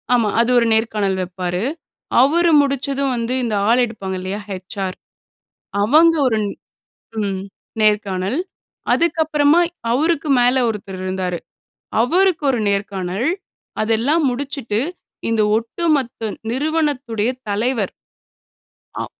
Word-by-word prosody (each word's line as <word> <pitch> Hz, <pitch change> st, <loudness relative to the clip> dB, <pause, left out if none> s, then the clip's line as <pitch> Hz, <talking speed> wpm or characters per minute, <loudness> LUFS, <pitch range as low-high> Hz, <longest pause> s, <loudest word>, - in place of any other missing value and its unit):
ஆமா, 230 Hz, -3 st, +2 dB
அது 235 Hz, -, +1 dB
ஒரு 235 Hz, -, +4 dB
நேர்காணல் 215 Hz, -3 st, +1 dB
வெப்பாரு. 180 Hz, +1 st, -3 dB, 0.6 s
அவரு 335 Hz, +6 st, +4 dB
முடிச்சதும் 275 Hz, -1 st, -1 dB
வந்து 235 Hz, +1 st, -2 dB
இந்த 225 Hz, -3 st, -1 dB
ஆள் 245 Hz, +2 st, +5 dB
எடுப்பாங்க 195 Hz, -5 st, -5 dB
இல்லையா? 190 Hz, +3 st, -4 dB
ஹெச்ஆர் 190 Hz, 0 st, -5 dB, 0.9 s
அவங்க 315 Hz, +10 st, +5 dB
ஒரு 220 Hz, -3 st, +1 dB, 0.8 s
ம் 195 Hz, -2 st, -2 dB, 0.4 s
நேர்காணல். 205 Hz, -, +1 dB, 0.5 s
அதுக்கு 335 Hz, 0 st, +1 dB
அப்புறமா 300 Hz, +1 st, +3 dB, 0.3 s
அவருக்கு 310 Hz, +4 st, +1 dB
மேல 245 Hz, +1 st, +4 dB
ஒருத்தரு 195 Hz, -3 st, -5 dB
இருந்தாரு, 185 Hz, -2 st, -2 dB, 0.6 s
அவருக்கு 350 Hz, +6 st, +2 dB
ஒரு 245 Hz, -, -1 dB
நேர்காணல். 200 Hz, +2 st, -1 dB, 0.5 s
அதெல்லாம் 230 Hz, +9 st, +2 dB
முடிச்சுட்டு 250 Hz, -4 st, -3 dB, 0.5 s
இந்த 225 Hz, -1 st, +2 dB, 0.2 s
ஒட்டுமொத்த 240 Hz, -2 st, -1 dB, 0.2 s
நிறுவனத்துடைய 270 Hz, -5 st, 0 dB, 0.2 s
தலைவர். 215 Hz, 0 st, 0 dB, 1.0 s
அ. -, -, -3 dB
230 Hz, 105 wpm, -20 LUFS, 200-280 Hz, 1.0 s, ஆள்